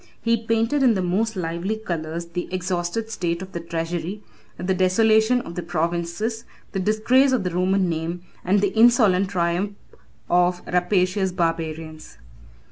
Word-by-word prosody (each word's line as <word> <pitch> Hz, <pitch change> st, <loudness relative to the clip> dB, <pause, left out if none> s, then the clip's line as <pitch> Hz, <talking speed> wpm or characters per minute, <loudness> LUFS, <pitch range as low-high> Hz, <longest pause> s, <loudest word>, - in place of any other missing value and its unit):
He 230 Hz, 0 st, +2 dB
painted 230 Hz, +5 st, +1 dB
in 245 Hz, -4 st, +5 dB
the 190 Hz, -, 0 dB
most 210 Hz, +5 st, 0 dB
lively 175 Hz, +3 st, -2 dB
colors 170 Hz, -5 st, -4 dB
the 175 Hz, +1 st, -5 dB
exhausted 185 Hz, +4 st, -2 dB
state 170 Hz, -3 st, -2 dB
of 190 Hz, -, -10 dB
the 170 Hz, -, -4 dB
treasury, 170 Hz, +4 st, -4 dB, 0.3 s
the 185 Hz, +1 st, -1 dB
desolation 220 Hz, +6 st, +3 dB
of 170 Hz, -, -9 dB
the 180 Hz, -, -4 dB
provinces, 170 Hz, +7 st, -2 dB, 0.3 s
the 195 Hz, -, -2 dB
disgrace 220 Hz, +7 st, +3 dB
of 255 Hz, -6 st, +1 dB
the 180 Hz, -, -2 dB
Roman 185 Hz, +2 st, +1 dB
name, 170 Hz, +1 st, -3 dB, 0.2 s
and 195 Hz, +2 st, +2 dB
the 200 Hz, -1 st, +1 dB
insolent 220 Hz, -5 st, +4 dB
triumph 180 Hz, +2 st, -1 dB, 0.5 s
of 180 Hz, 0 st, +2 dB
rapacious 185 Hz, +1 st, +1 dB
barbarians. 165 Hz, -2 st, -3 dB
185 Hz, 145 wpm, -23 LUFS, 170-215 Hz, 0.5 s, in